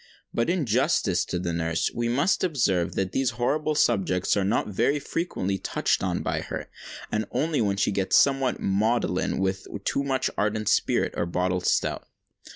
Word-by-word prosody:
But, 115 - 0
in 175 -4 +1
justice 115 - +2
to 90 - -3
the 85 -1 -2
nurse, 80 -1 0
we 120 0 -1
must 145 +10 +1
observe, 115 - +1
that 95 -1 -1
these 135 -2 +1
horrible 150 +5 0
subjects 95 -9 +2
are 100 - +1
not 100 - +1
very 120 +8 +1
frequently 100 - -2
touched - - 0
on - - -1
by - - -1
her—and 110 0 -6
only 155 -3 0
when 100 -2 0
she 100 - +1
gets 95 -1 +1
somewhat 135 -2 +3
maudlin 100 -1 0
with 95 0 -1 0.2
too 140 - +1
much 135 -2 0
ardent 105 0 0
spirit - - +1
or 85 - -1
bottled 90 +1 -1
stout. - - 0
110 Hz, 165 wpm, -26 LUFS, 95-135 Hz, 0.2 s, somewhat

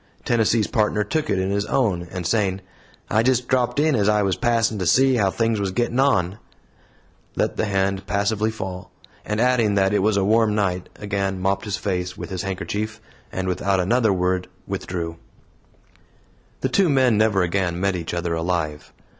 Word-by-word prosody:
Tennessee's 115 -2 +2
Partner 105 -1 +1
took 155 +5 -2
it - - +1
in 95 +1 -1
his 100 +1 -1
own, 95 -10 0
and 90 -2 -5
saying, 100 -1 0 0.5
"I 110 - +2
just 125 0 +1
dropped 130 +1 +1
in 155 +1 +3
as 105 -2 +2
I 105 -1 +3
was 95 -2 +1
passin' 115 -3 +1
to 90 - -1
see 130 +3 +4
how 100 -3 +2
things 115 +1 0
was 100 -1 -1
gettin' 120 +5 -1
on," 95 -8 +2 1.0
let - - 0
the - - 0
hand 95 -1 -1
passively 105 +2 0
fall, 95 -4 -6 0.3
and 105 +1 -2
adding 120 -4 +3
that 95 0 +2
it 105 - +3
was 105 +1 +2
a 95 - +2
warm 110 0 +3
night, 90 -4 -1
again 100 -2 -2
mopped 95 +3 0
his 100 -3 -2
face 90 -1 -3
with - - -7
his 90 -2 -3
handkerchief, 105 +3 -4 0.3
and 95 0 -3
without 95 +1 0
another 110 +4 +2
word 90 0 0 0.2
withdrew. 90 -4 -4 1.4
The - - 0
two 195 -4 +3
men 130 -5 +3
never 105 -3 +3
again 90 -1 -1
met 100 0 +1
each 85 -1 -4
other 85 0 -2
alive. 80 -3 -2
100 Hz, 180 wpm, -22 LUFS, 95-110 Hz, 1.4 s, see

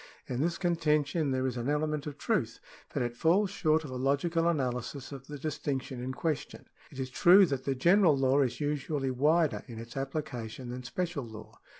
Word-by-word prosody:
In 125 +1 -3
this 170 +2 0
contention 155 -3 +1
there 130 0 0
is 125 -1 -2
an 120 +3 -2
element 150 0 -1
of 145 - -6
truth, - - -1 0.3
but - - -1
it 120 0 -3
falls 185 - +3
short 160 -5 +2
of 145 - -7
a 130 - -4
logical 155 +6 +1
analysis 130 -3 -2
of 135 -1 -9
the 150 - -7
distinction 135 -3 -3
in 130 - -3
question. 150 +1 -3 0.2
It - - -13
is 130 -1 -4
true 185 +8 +7
that 135 -5 -3
the 135 - 0
general 170 +2 +5
law 135 +1 +3
is 125 -3 -1
usually 145 -2 -1
wider 150 +5 +2
in 115 -3 -9
its 115 +1 -8
applica 135 -4 -4
tion 125 +2 -8
than 125 +1 -5
special 170 +3 -3
law. 110 -2 -11
140 Hz, 200 wpm, -30 LUFS, 130-160 Hz, 0.3 s, true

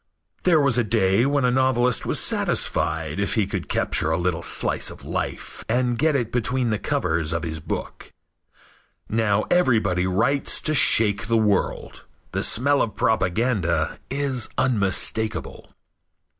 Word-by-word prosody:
There 170 -4 +5
was 135 -4 +3
a - - +2
day 105 +1 +2
when 140 -2 +1
a 125 - +2
novelist 125 -1 +1
was - - 0
satisfied 80 +2 -1
if 100 - -1
he 110 -3 +2
could 100 - -5
capture 80 - +1
a 80 - +1
little 85 -1 -1
slice - - 0
of - - -12
life - - -5
and 120 +1 +1
get 155 +4 +1
it 120 -4 -1
between 125 0 0
the 105 - -1
covers 80 -2 -1
of 85 0 -2
his 80 -1 -4
book. - - -6 1.0
Now 110 -1 +1
everybody 110 - +2
writes 115 +10 0
to 155 - -1
shake 105 -7 +4
the 115 0 +2
world. 105 -3 -1 0.3
The - - -2
smell 140 +5 +2
of 110 - -2
propaganda 95 -7 0
is 135 -3 -1
unmistakable. 110 -2 -1
110 Hz, 145 wpm, -23 LUFS, 95-125 Hz, 1.0 s, There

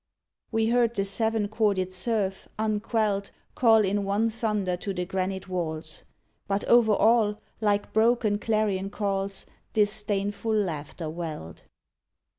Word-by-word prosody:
We 225 0 +1
heard 235 -1 +2
the 195 - 0
seven 220 +1 +1
chorded 200 -4 0
surf, 195 0 -1
unquelled, 215 -1 0 0.2
Call 225 -3 +5
in 200 +1 0
one 205 +3 +1
thunder 210 -5 -1
to 195 +1 -4
the 180 - -2
granite 190 +1 -3
walls; 160 -4 -4 0.4
But 200 0 0
over 235 -3 +5
all, 215 -1 +3 0.2
like 205 -1 0
broken 220 -2 +3
clarion 210 -3 0
calls, 195 -1 -2 0.3
Disdainful 205 0 0
laughter 165 -5 -2
welled. 155 - -6
205 Hz, 120 wpm, -27 LUFS, 190-220 Hz, 0.4 s, Call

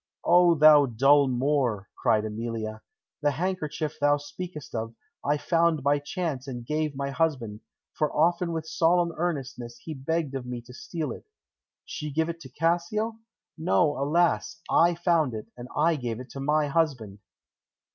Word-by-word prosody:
"O, 175 0 +6
thou 150 -2 +7
dull 135 +4 +4
Moor!" 125 -5 0
cried 110 -1 +2
Emilia. 110 0 -4 0.4
"The 145 - +3
handkerchief 155 -1 -3
thou 145 0 +4
speakest 150 +1 -8
of, 115 0 -4 0.3
I 145 +1 +1
found 165 -2 +1
by 145 +1 +3
chance 145 -3 -4
and 120 -3 -6
gave 150 +1 -1
my 140 0 -3
husband, 135 -9 -1 0.3
for 150 -1 0
often 170 +2 +2
with 160 -1 -3
solemn 170 +1 +2
earnestness 135 -8 -4
he 160 - -5
begged 150 +1 -2
of 130 -2 -5
me 125 -1 -4
to 125 +1 -13
steal 160 +4 -4
it.... - - -9 0.6
She 150 -2 -5
give 160 +3 0
it 170 0 -6
Cassio? 175 +8 0 0.4
No, 160 -2 +2
alas! 160 +5 +1
I 170 +1 +4
found 165 -7 +1
it, 110 - -6
and 120 0 -9
I 160 +2 +3
gave 120 -4 -4
it 125 - -10
to 135 - -7
my 150 +2 +2
husband." 135 -10 -1
150 Hz, 155 wpm, -27 LUFS, 130-165 Hz, 0.6 s, thou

